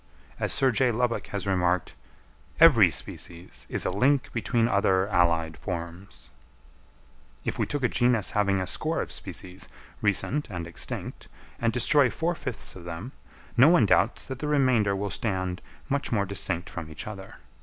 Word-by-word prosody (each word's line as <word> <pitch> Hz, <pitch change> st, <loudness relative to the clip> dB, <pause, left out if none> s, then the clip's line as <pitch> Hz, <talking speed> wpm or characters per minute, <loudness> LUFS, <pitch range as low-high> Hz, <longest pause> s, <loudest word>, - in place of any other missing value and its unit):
As -, -, -1 dB
Sir 135 Hz, -1 st, +3 dB
J. 125 Hz, +2 st, +2 dB
Lubbock 120 Hz, +1 st, -1 dB
has 100 Hz, -2 st, -4 dB
remarked, 90 Hz, -2 st, +1 dB, 0.7 s
"Every -, -, +8 dB
species 85 Hz, +1 st, -6 dB
is -, -, -2 dB
a -, -, +1 dB
link 130 Hz, +8 st, +2 dB
between 115 Hz, 0 st, +1 dB
other 95 Hz, -2 st, +2 dB
allied 85 Hz, -4 st, +2 dB
forms." 85 Hz, -1 st, -7 dB, 1.1 s
If -, -, -3 dB
we -, -, +1 dB
take 145 Hz, -2 st, -3 dB
a -, -, +5 dB
genus 120 Hz, -5 st, +1 dB
having 100 Hz, -2 st, +2 dB
a 95 Hz, -, -1 dB
score -, -, -2 dB
of -, -, -3 dB
species, 95 Hz, +1 st, -6 dB, 0.3 s
recent 105 Hz, +8 st, 0 dB
and 85 Hz, -2 st, -5 dB
extinct, 85 Hz, 0 st, -6 dB, 0.3 s
and 115 Hz, -1 st, +1 dB
destroy 130 Hz, +3 st, +4 dB
four 165 Hz, +8 st, -1 dB
fifths 130 Hz, -8 st, -4 dB
of 90 Hz, -, -10 dB
them, 85 Hz, +9 st, -6 dB, 0.4 s
no 130 Hz, +5 st, +7 dB
one 165 Hz, -10 st, +5 dB
doubts -, -, +2 dB
that 130 Hz, -1 st, -6 dB
the 150 Hz, -, -3 dB
remainder 130 Hz, -9 st, +3 dB
will 100 Hz, 0 st, -3 dB
stand 95 Hz, -4 st, -2 dB, 0.3 s
much 140 Hz, 0 st, -1 dB
more 100 Hz, -4 st, +1 dB
distinct 95 Hz, -3 st, -2 dB
from 80 Hz, -3 st, -7 dB
each 80 Hz, -, -7 dB
other. 100 Hz, -3 st, -8 dB
100 Hz, 165 wpm, -27 LUFS, 90-125 Hz, 1.1 s, Every